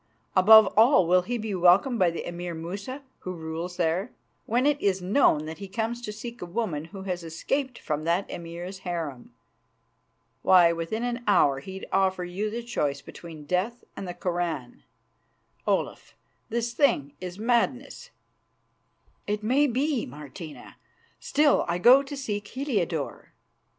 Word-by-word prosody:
Above 215 +3 +9
all, 225 -3 +6
will 180 +2 +4
he 240 +7 -3
be 220 -2 -4
welcomed 190 +7 +4
by 180 - +4
the 170 - -5
Emir 175 0 -5
Musa, 200 - -6 0.2
who 185 - -6
rules 165 +2 -5
there, 175 +6 0 0.4
when 245 +4 +2
it 290 -1 +2
is 195 -2 +1
known 180 - +3
that 160 +3 -7
he 200 - -7
comes 225 +4 -3
to 215 - -5
seek 235 +3 -8
a - - -4
woman 170 -6 -2
who 190 +3 -9
has 180 -2 -3
escaped 250 - -2
from 155 -1 -3
that 170 +4 0
Emir's 175 +3 -7
harem? 165 -8 -5 1.1
Why, 175 -2 +6
within 170 +8 -3
an 245 0 -3
hour 140 -9 +4
he'd 190 +6 -8
offer 190 -1 +1
you 185 +5 -3
the 235 +2 -5
choice 145 - -2
between 160 -3 -11
death 195 +9 -1
and 195 - -6
the 175 - -5
Koran. 175 -8 -3 0.9
Olaf, - - -1 0.3
this 235 +1 -2
thing 235 - +2
is 180 0 -6
madness." 245 - -1 1.2
"It 210 +1 -2
may 270 +7 +3
be, 270 0 0
Martina. 150 +2 -10 0.4
Still, 295 -1 +3
I 170 0 0
go 250 +9 +7
to 280 +1 -7
seek 205 -6 -4
Heliodore." 205 - -3
190 Hz, 150 wpm, -26 LUFS, 170-235 Hz, 1.2 s, Above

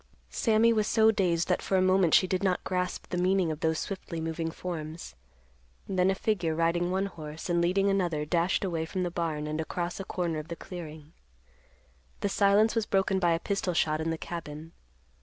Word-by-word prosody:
Sammy 230 0 +3
was 215 -1 +1
so 220 -1 +5
dazed 175 -5 +1
that 180 - +1
for 190 - 0
a - - +3
moment 185 -3 +4
she - - +5
did 185 0 -1
not 185 -2 0
grasp 180 -1 -2
the 180 - -2
meaning 185 -2 +2
of 155 - -5
those 160 -1 +1
swiftly 170 -3 -5
moving 160 0 -3
forms. 165 - -6 0.7
Then 185 -1 +2
a 195 - +2
figure 180 -6 0
riding 170 +2 +1
one 190 +2 0
horse 160 -2 -6
and 170 0 +2
leading 190 +3 +2
another 175 -6 0
dashed 170 +5 +1
away 165 -3 -2
from 185 +2 -2
the 175 - -2
barn 160 -3 -2
and 155 +1 -2
across 175 +3 -4
a - - -3
corner 175 -4 -2
of 155 - -8
the 170 - -5
clearing. 160 -3 -9 1.1
The 200 - 0
silence 200 +2 +4
was 225 -2 -1
broken 195 0 +1
by 175 -2 +3
a 165 - 0
pistol 195 -2 -2
shot 155 -1 +1
in 160 - -1
the 165 - -1
cabin. 160 -1 -7
175 Hz, 200 wpm, -29 LUFS, 160-190 Hz, 1.1 s, so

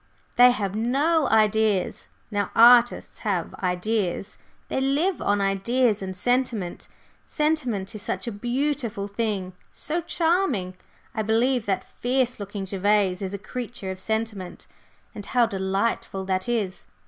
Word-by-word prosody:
They 245 +1 +8
have 205 -6 -1
no 275 +7 +2
ideas. 215 -2 +2 0.2
Now, 205 -2 -1
artists 240 +1 +5
have 195 -6 -2
ideas, 185 +1 -1 0.3
they 265 - -1
live 295 +8 +1
on 205 0 +1
ideas 210 +3 +1
and 190 -1 -5
sentiment. 245 -5 -1 0.4
Sentiment 255 -11 -1
is 215 - -7
such - - -3
a 235 - -3
beautiful 240 -2 -2
thing 200 -3 -2 0.2
so 335 +3 -2
charming! 325 - 0 0.4
I 220 - -1
believe 230 +2 +1
that 195 -2 0
fierce 250 -1 0
looking 200 -1 -5
Gervase 195 -1 +1
is 195 0 -3
a 200 +1 -11
creature 240 -6 -4
of 185 - -7
sentiment 220 -3 -3 0.5
and 205 - -7
how 240 +4 +2
delightful 195 -1 -2
that 190 +3 -1
is! 210 -6 -2
215 Hz, 135 wpm, -25 LUFS, 195-245 Hz, 0.5 s, They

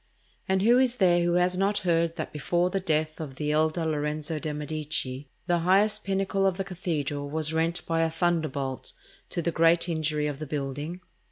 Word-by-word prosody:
And 190 0 +2
who 240 +3 +6
is 255 -2 +2
there 175 -6 +4
who 175 0 +2
has 180 +1 +2
not 200 +2 +1
heard 165 -1 +2
that - - -5
before 175 +4 0
the 195 - 0
death 155 -3 -1
of 140 -4 -6
the 150 +2 -1
elder 155 +2 +1
Lorenzo 150 0 -2
de' 155 0 -3
Medici, 150 -3 -3 0.2
the 175 -1 +2
highest 205 +5 +3
pinnacle 195 0 +1
of 185 -2 0
the 195 - -1
cathedral 155 -6 -3
was 155 +1 -1
rent 165 +2 0
by 165 0 +1
a 165 - +2
thunderbolt, 155 -6 -1 0.4
to 170 - -2
the 170 - +1
great 165 +2 +3
injury 155 -2 0
of 145 -2 -3
the 155 - -5
building? 145 +5 -4
165 Hz, 190 wpm, -27 LUFS, 150-180 Hz, 0.4 s, who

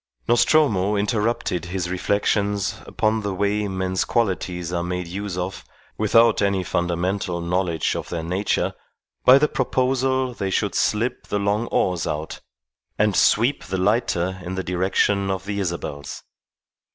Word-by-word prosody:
Nostromo 115 -5 +3
interrupted 105 -4 0
his 90 0 -3
reflections 100 +1 0
upon 110 +1 0
the 100 -2 -3
way 100 +2 0
men's 95 -1 -1
qualities 90 -6 -1
are 85 - 0
made 90 0 -3
use 95 +1 -5
of, 90 +1 -4 0.3
without 115 +1 +4
any 100 -2 +1
fundamental 90 +1 -1
knowledge 85 -1 0
of - - -5
their 85 -2 -3
nature, 95 +5 0 0.5
by 130 +1 +9
the 150 +2 +3
proposal 130 -1 0
they 100 -4 -3
should - - 0
slip 115 +4 0
the 105 - -1
long 105 +3 0
oars 90 -3 0
out 75 +1 -4 0.6
and 105 -2 +2
sweep 120 +10 +3
the 95 - -3
lighter 95 -2 0
in 90 +1 -5
the 95 - -2
direction 95 +2 +1
of 95 0 -2
the 100 0 -3
Isabels. 85 -6 -4
95 Hz, 140 wpm, -23 LUFS, 90-105 Hz, 0.6 s, by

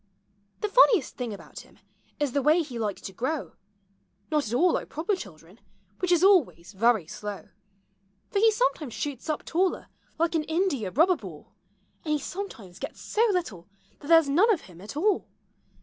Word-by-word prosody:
The 425 - +1
funniest 450 -2 +4
thing 245 -3 -4
about 205 - -10
him - - -16 0.4
is 290 -3 0
the 280 - 0
way 310 +5 +4
he 250 -6 -7
likes 210 -3 -3
to 190 - -8
grow 265 - -3 0.4
— 195 0 -42
Not 300 -5 +1
at 215 - -5
all 345 +6 +4
like - - -2
proper 340 +7 -1
children, 180 - -12 0.4
which 365 -1 0
is 350 0 +4
always 310 - +3
very 220 -2 +2
slow; 205 +4 -7 0.8
For 400 - +1
he 445 +1 +5
sometimes 415 - -1
shoots 285 -1 -5
up 305 - -2
taller 365 +2 0 0.3
like 335 +1 +1
an 320 -2 +1
india 320 - 0
rubber 330 - +3
ball. 180 - -11 0.5
And 305 - -1
he - - +2
sometimes 265 - -7
gets - - -7
so 430 - -2
little 275 - -3 0.3
that 285 - -11
there 330 +1 +8
's - - -9
none 360 +12 +4
of 375 - +1
him 175 -1 -15
at 210 +8 -8
all. 395 +4 +1
295 Hz, 185 wpm, -27 LUFS, -, 0.8 s, there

